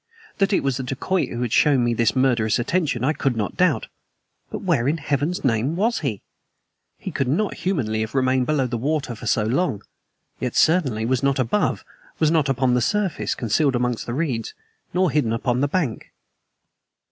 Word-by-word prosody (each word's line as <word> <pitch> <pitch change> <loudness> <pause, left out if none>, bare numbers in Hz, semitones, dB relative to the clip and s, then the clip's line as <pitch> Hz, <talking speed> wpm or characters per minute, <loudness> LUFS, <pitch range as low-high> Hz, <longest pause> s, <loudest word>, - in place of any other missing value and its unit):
That 195 0 +2
it 195 - +2
was 135 -2 0
the 130 - -4
dacoit 150 +8 -1
who 120 +1 -3
had 120 - -2
shown 140 -5 +4
me 120 0 +1
this 115 +1 +1
murderous 120 -5 +2
attention 140 -1 0
I 145 +4 +2
could 135 -6 -1
not 105 -3 -2
doubt. 180 -6 +2 0.6
But - - -6
where 115 - +1
in 155 +4 +1
Heaven's 150 +5 -1
name 130 +4 +1
WAS 225 +6 +1
he? 115 - -3 0.7
He - - -6
could 135 - -1
not 185 +11 0
humanly 130 - -1
have 110 +4 -4
remained 130 -1 +2
below 150 -4 +1
water 130 +3 -2
for 115 +1 -8
so 110 -1 +2
long; 125 - 0 0.6
yet 125 -2 -2
he - - +2
certainly 135 -10 +2
was 130 +1 +1
not 140 -1 +1
above, 130 - 0 0.3
was 155 -1 +2
not 155 -4 +2
upon 130 -1 +2
the 125 - +2
surface, 200 - 0
concealed 130 +4 +1
amongst 125 -1 -1
the 120 - -3
reeds, 130 -8 -2 0.4
nor 180 -2 +2
hidden 135 -6 +1
upon 120 +2 0
the 145 - +2
bank. 145 -7 -2
130 Hz, 190 wpm, -22 LUFS, 120-155 Hz, 0.7 s, shown